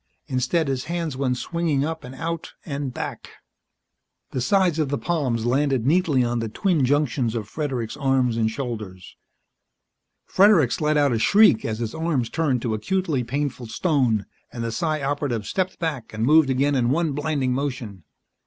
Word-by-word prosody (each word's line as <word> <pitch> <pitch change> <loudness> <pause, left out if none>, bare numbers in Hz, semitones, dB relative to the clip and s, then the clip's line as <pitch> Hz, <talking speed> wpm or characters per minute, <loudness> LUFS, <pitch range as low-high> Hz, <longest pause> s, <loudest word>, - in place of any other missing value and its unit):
Instead 130 +5 0
his 130 -2 -2
hands 170 -4 -3
went 130 -2 0
swinging 160 -3 -1
up 160 0 -4
and 125 +1 -9
out 165 +3 -4
and 140 -3 -3
back. - - -6 1.0
The 130 - -2
sides 180 +3 +2
of 150 -3 0
the 140 - -1
palms 130 -10 -1
landed 135 -1 +1
neatly 150 -4 +3
on 120 0 -1
the 115 -1 -3
twin 170 - +1
junctions 130 -4 +1
of 110 -3 -3
Fredericks' 130 -4 -3
arms 135 -4 +1
and 110 -1 +1
shoulders. 110 -7 -6 1.1
Fredericks 185 - +4
let 150 0 +2
out 145 -2 +3
a 115 - 0
shriek 205 - +5
as 110 -1 -2
his 115 -1 -4
arms 160 -8 -1
turned 140 -7 0
to 115 - -1
acutely 150 - -1
painful 130 0 -3
stone, 125 - +1 0.3
and 115 - -5
the 115 - -2
Psi 155 +3 -1
Operative 135 -6 -1
stepped 185 -1 -2
back 150 -9 -3
and 110 +1 0
moved 155 +1 +5
again 135 +2 +2
in 125 -3 +2
one 160 +3 +1
blinding 145 -3 -1
motion. 125 - -4
135 Hz, 170 wpm, -23 LUFS, 120-155 Hz, 1.1 s, shriek